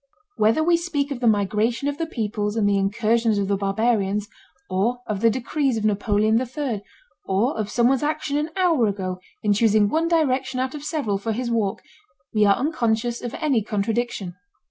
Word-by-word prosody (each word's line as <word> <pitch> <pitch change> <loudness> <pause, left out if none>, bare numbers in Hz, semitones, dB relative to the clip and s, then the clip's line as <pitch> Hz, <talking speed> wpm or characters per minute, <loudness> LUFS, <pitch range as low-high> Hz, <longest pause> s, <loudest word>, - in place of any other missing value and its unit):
Whether 225 +9 +3
we 340 +1 +4
speak 295 -5 -2
of 265 - -3
the 240 - +1
migration 215 +5 +1
of 285 +2 -3
the 330 - -1
peoples 210 -5 -2
and 215 -3 +2
the 200 - +3
incursions 220 +2 +1
of 200 -1 0
the 200 - +1
barbarians, 205 0 0 0.4
or 230 +7 -1
of 205 -2 -3
the 230 - +5
decrees 260 +2 -1
of 215 - -2
Napoleon 215 +2 +2
III, 255 -4 -3 0.4
or 210 +9 +1
of 215 -2 -3
someone's 245 +3 +2
action 300 -1 -1
an 300 +2 0
hour 330 - +3
ago 185 -2 -3 0.2
in 205 -1 +3
choosing 210 -1 +3
one 325 +5 +1
direction 265 -6 +1
out 260 0 -1
of 295 -2 -7
several 285 - -1
for 225 +2 -2
his 240 +1 -3
walk, 215 -4 -1 0.5
we 215 -1 +4
are 200 - +5
unconscious 240 -5 -1
of 240 - -5
any 280 -8 +1
contradiction. 210 -2 -2
230 Hz, 185 wpm, -23 LUFS, 205-270 Hz, 0.5 s, the